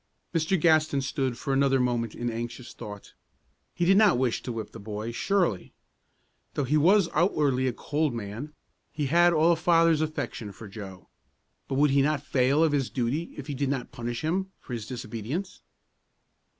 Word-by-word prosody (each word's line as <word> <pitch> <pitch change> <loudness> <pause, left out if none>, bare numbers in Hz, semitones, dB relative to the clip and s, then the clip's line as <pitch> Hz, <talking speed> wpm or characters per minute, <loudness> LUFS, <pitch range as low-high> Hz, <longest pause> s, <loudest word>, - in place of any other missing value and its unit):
Mr. 165 +2 +1
Gaston 155 -3 +3
stood 130 -2 -2
for 135 - -2
another 135 0 +3
moment 120 -3 0
in 120 0 -2
anxious 120 +2 -6
thought. 105 -1 -9 0.6
He 175 - 0
did 195 +2 +5
not 210 - +5
wish 125 -2 0
to 125 - -5
whip 110 -2 -5
the 115 - -10
boy, 105 +2 -5
surely. 170 - 0 0.8
Though 145 - 0
he 135 +4 0
was 180 +5 +5
outwardly 145 -6 +2
a - - +1
cold 150 +5 -1
man, 115 +7 -6 0.4
he 150 -2 -2
had 175 +5 +5
all 165 +1 +4
a - - +4
father's 165 -1 +3
affection 130 -9 -4
for 110 +2 -10
Joe; 95 -3 -10 0.6
but 135 - -2
would 145 +1 +4
he 140 0 +4
not 145 0 +1
fail 140 +4 +3
of 160 - +3
his 140 -4 0
duty 135 +7 -2
if 145 - -6
he 145 - -4
did 140 0 -1
not 135 -3 -3
punish 120 -2 -4
him 190 +5 -1
for 125 - -9
his 110 -3 -5
disobedience? 120 - -5
135 Hz, 180 wpm, -27 LUFS, 120-155 Hz, 0.8 s, did